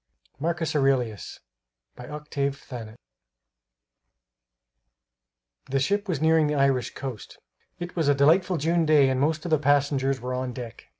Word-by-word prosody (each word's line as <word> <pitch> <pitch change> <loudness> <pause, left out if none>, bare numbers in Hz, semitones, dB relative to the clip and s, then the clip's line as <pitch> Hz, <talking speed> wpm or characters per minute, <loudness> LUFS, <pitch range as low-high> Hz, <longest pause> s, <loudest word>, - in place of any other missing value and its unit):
MARCUS 165 +1 -2
AURELIUS 130 -7 0 0.5
By 125 - -10
Octave 145 -2 -3
Thanet 115 -5 -9 2.7
The 135 +1 +1
ship 200 +8 0
was 165 -6 -1
nearing 160 0 +3
the 150 - -1
Irish 135 -4 +1
coast. 130 -7 -7 0.4
It 175 0 -7
was 165 -4 0
a 145 - +4
delightful 165 +6 +3
June 165 +2 +1
day 145 -3 +5
and 130 0 0
most 155 +2 0
of 175 - -4
the 155 - +4
passengers 140 -1 +1
were 125 +2 -4
on 125 0 -3
deck. 120 -4 -9
140 Hz, 140 wpm, -25 LUFS, 130-160 Hz, 2.7 s, day